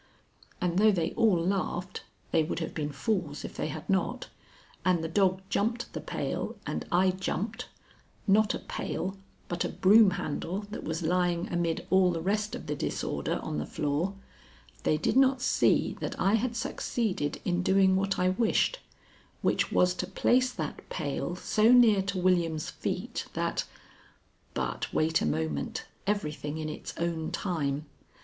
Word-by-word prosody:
And 180 0 +1
though 215 +1 +6
they 170 -4 0
all 220 -7 +3
laughed 180 0 -2 0.3
they 165 - +4
would 155 - -2
have 165 -1 -3
been 150 -2 -2
fools 160 -1 -2
if - - -8
they - - -2
had 155 0 -6
not 190 -1 0 0.5
and 180 -3 +2
the - - -1
dog 185 +2 +2
jumped 230 +5 -1
the - - -4
pail - - -3
and - - -3
I 185 +2 +4
jumped 210 +5 -3 0.6
not 210 +1 +4
a - - -2
pail, 190 +2 -4 0.3
but 175 -1 -2
a - - -1
broom 210 +2 +6
handle 175 +6 -3
that 215 - -5
was 160 +2 -3
lying 175 0 +1
amid 170 -1 0
all 190 -1 +5
the 170 -2 -1
rest 210 +5 -1
of - - -8
the 150 -1 -2
disorder 70 - -2
on 75 - -3
the 75 - -2
floor 150 +7 -1 0.7
they 155 - +2
did 155 - 0
not 265 -1 +5
see 250 - +2
that - - -4
I 195 - +3
had 230 +2 +1
succeeded 220 - -2
in 175 0 +1
doing 190 0 +4
what 195 +1 0
I 180 0 +3
wished, 230 - +2 0.6
which - - +1
was 180 0 +4
to - - -4
place 255 +1 +2
that - - -6
pail 160 +2 -3
so 215 +5 +3
near 230 -5 +7
to 195 0 -3
William's 170 -4 +1
feet - - -3
that - - -1 0.9
But - - -2
wait 160 +1 +2
a - - +1
moment; 75 -2 -2 0.2
everything 155 -7 -2
in 155 -1 -3
its 150 - -7
own 165 -2 -1
time. 150 -6 -2
180 Hz, 165 wpm, -29 LUFS, 160-205 Hz, 0.9 s, near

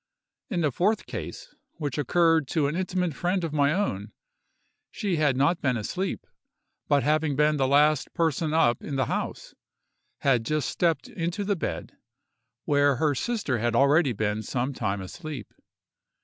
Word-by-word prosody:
In 185 -7 -1
the 150 -3 +1
fourth 200 - +1
case, - - -7 0.2
which 145 -3 -4
occurred 165 +1 +3
to 150 +1 +1
an 145 +3 -1
intimate 180 -2 -1
friend 180 +4 -1
of 160 -3 -3
my 145 -1 +3
own, 110 - -2 0.8
she 195 -5 -2
had 145 -4 +2
not 165 +6 +2
been 130 -3 +1
asleep; 185 - -3 0.6
but 140 -3 +3
having 155 0 +1
been 150 +1 +3
the 135 -2 +2
last 150 +1 +3
person 160 -1 0
up 120 -8 +3
in 140 - -4
the 130 - +1
house, - - -4 0.7
had 125 -5 +3
just 155 +5 -1
stepped 170 -2 0
into 175 +4 -3
the 200 0 0
bed, 85 - -5 0.7
where 145 -1 +3
her 150 +3 +1
sister 150 - -1
had 120 +2 0
already 140 +1 +4
been 105 -1 -1
some 125 +5 -2
time 100 -5 -2
asleep. 140 - -8
150 Hz, 160 wpm, -26 LUFS, 130-170 Hz, 0.8 s, already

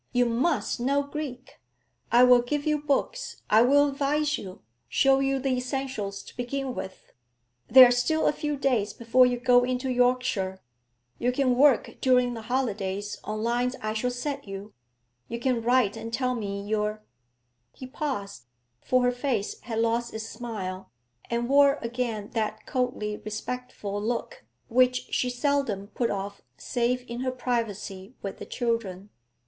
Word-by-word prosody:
You 245 0 +4
must 250 +5 0
know 280 +4 +1
Greek! 280 -3 -7 0.5
I 240 +1 +7
will 250 -1 +7
give 285 +4 -2
you 300 -1 +1
books, 300 - -2
I 215 +1 +7
will 285 +4 +5
advise 295 +2 0
you, 185 -7 -9 0.3
show 270 0 +4
you 270 0 +1
the 270 +1 -1
essentials 250 -6 -3
to - - -14
begin 260 +2 -3
with. 190 - -8 0.6
There 260 -1 +10
are - - +1
still 280 +6 +1
a - - +3
few 295 -1 -3
days 250 -7 +1
before 245 +2 +4
you 245 -1 -1
go 245 0 +5
into 255 +1 -1
Yorkshire; 245 -6 +1 0.6
you 245 - +1
can 255 -1 +2
work 270 -1 +4
during 250 -2 +3
the 230 - -6
holidays 205 -5 -2
on 215 +1 -4
lines 245 +2 0
I 215 0 -3
shall 225 +3 0
set 275 +1 -4
you; 195 +2 -8 0.5
you 235 - -4
can 245 -1 0
write 240 -3 +2
and 230 - -6
tell 255 +1 0
me 200 -4 -4
your 215 0 -1 0.3
' 120 0 -48
He 260 - -7
paused, 255 - -4 0.4
for 255 0 +2
her 245 - +3
face 245 -5 -2
had 230 -2 -5
lost 230 +1 0
its 220 0 -5
smile, 195 -7 -6 0.4
and 235 0 -1
wore 280 +1 +5
again 230 -3 -3
that 220 -1 -2
coldly 245 -5 -2
respectful 215 -2 -5
look 230 - -3 0.2
which 255 +1 +2
she 250 - +1
seldom 245 -6 -1
put 235 0 -1
off 200 0 -4 0.2
save 250 0 -1
in 235 +1 -5
her 255 0 -1
privacy 230 -4 -3
with 195 - -5
the - - -8
children. 210 -5 -2
245 Hz, 160 wpm, -27 LUFS, 215-260 Hz, 0.6 s, There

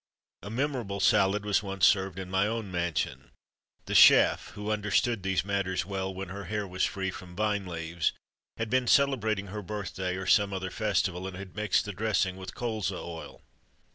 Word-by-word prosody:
A 105 - -8
Memorable 120 -5 -2
Salad 100 +2 +3
was 105 -1 +2
once 95 -4 +1
served 95 -3 +3
in 95 -1 -5
my 95 +2 +2
own 110 -3 -3
mansion. 85 -2 -2 0.6
The - - -4
chef, - - +7
who 105 +1 -3
understood 105 +2 +1
these 95 0 0
matters 95 -2 -1
well, 95 -1 -3
when 95 -1 -6
her 100 +1 -7
hair 105 -2 -3
was 90 0 -2
free 95 -1 -1
from 90 -1 -10
vine 105 -1 0
leaves, 85 -1 -1 0.5
had 115 -1 -3
been 130 -1 +2
celebrating 110 -8 +2
her 105 - -4
birthday 95 -2 -4
or 95 0 -5
some 100 0 +3
other 95 -1 -3
festival; 90 +1 0
and 95 -1 -7
had 95 -1 -9
mixed 105 0 +1
the 105 - -5
dressing 95 -2 0
with 95 0 -8
Colza 110 -6 -2
oil. 85 -1 -8
100 Hz, 180 wpm, -29 LUFS, 95-105 Hz, 0.6 s, chef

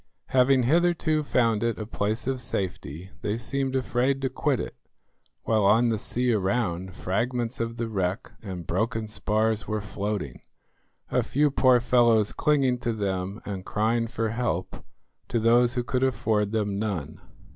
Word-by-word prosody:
Having 130 0 +4
hitherto 165 +2 +2
found 115 -7 +1
it 115 -1 0
a 110 - -4
place 110 +1 -2
of 130 -1 -1
safety 95 - -4
they 105 +2 -1
seemed 135 +2 -2
afraid 130 +1 +1
to 130 - 0
quit 135 -1 0
it, - - -5 0.7
while 110 -2 +2
on 115 +4 +4
the 110 -2 0
sea 125 +2 0
around 95 -3 -1
fragments 120 +5 -2
of 115 0 -3
the 115 - -2
wreck 95 +1 -2
and 95 -5 -6
broken 110 +5 -1
spars 110 +1 0
were 110 0 -1
floating, 100 - -4 0.7
a - - +3
few 145 +1 +1
poor 130 -2 +5
fellows 120 -3 +3
clinging 135 -5 +2
to 120 -1 -1
them 100 -1 -3
and 95 -2 -5
crying 115 +4 0
for 115 -1 -2
help 110 -6 -3 0.4
to 120 - 0
those 120 +2 +4
who 125 - 0
could 125 +2 -1
afford 110 -5 +1
them 105 -3 -1
none. 90 -9 -3
115 Hz, 155 wpm, -26 LUFS, 105-125 Hz, 0.7 s, poor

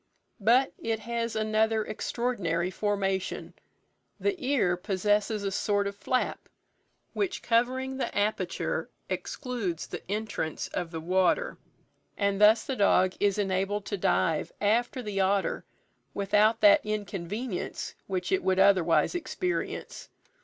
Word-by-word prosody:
But 240 +6 +4
it 225 -1 -2
has 230 0 -3
another 220 0 +1
extraordinary 200 -7 -1
formation; 195 -2 -2 0.7
the 405 - +1
ear 250 -10 +2
possesses 205 +3 0
a 195 - -1
sort 205 +1 +1
of 200 0 -3
flap, 255 +5 -2 0.6
which 395 -3 -2
covering 255 +3 +1
the 270 - -3
aperture 210 +1 -1 0.2
excludes 230 - -3
the - - -7
entrance 210 -7 -3
of 175 -2 -3
the 165 -1 -5
water, 185 - +1 0.6
and 200 0 0
thus 215 +2 +6
the 265 - -3
dog 185 -3 +3
is 200 -1 +2
enabled 195 +1 -1
to 205 - -2
dive 175 -4 +1
after 235 +5 +1
the 205 -3 -3
otter 195 +1 +1 0.5
without 210 +3 +3
that 305 -1 +7
inconvenience 210 0 -4
which 185 -2 -2
it 190 - +2
would 185 0 +2
otherwise 190 - +4
experience. 360 +1 -3
205 Hz, 125 wpm, -28 LUFS, 190-230 Hz, 0.7 s, that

